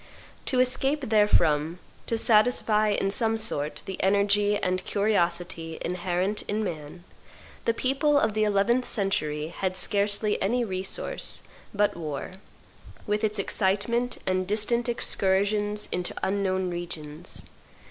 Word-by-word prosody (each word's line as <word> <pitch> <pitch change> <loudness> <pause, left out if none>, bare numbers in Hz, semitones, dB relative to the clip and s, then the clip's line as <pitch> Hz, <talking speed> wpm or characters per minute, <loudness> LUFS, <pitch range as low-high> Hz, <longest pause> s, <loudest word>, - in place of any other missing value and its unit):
To 255 - +2
escape 265 +1 +1
therefrom, 165 -7 +3 0.3
to 230 - 0
satisfy 215 -1 +3
in 200 -1 +1
some 225 +1 +1
sort 155 -10 -1
the 190 - -5
energy 205 +1 +3
and 185 -1 -1
curiosity 175 -5 -1
inherent 180 +3 -1
in 215 +1 -1
man, 160 -1 -6 0.6
the 230 - +3
people 275 +4 +2
of 220 -5 +1
the 215 0 +1
eleventh 215 +5 +2
century 155 -7 0
had 185 +1 -2
scarcely 205 +3 +1
any 240 +5 +1
resource 190 - -4 0.3
but 205 0 +1
war, 155 -3 -5 0.7
with 210 0 -1
its 215 0 +1
excitement 205 +5 0
and 185 0 0
distant 235 +4 +1
excursions 205 -1 +1
into 180 0 -2
unknown 190 -2 0
regions. 170 -1 -6
200 Hz, 120 wpm, -26 LUFS, 180-215 Hz, 0.7 s, therefrom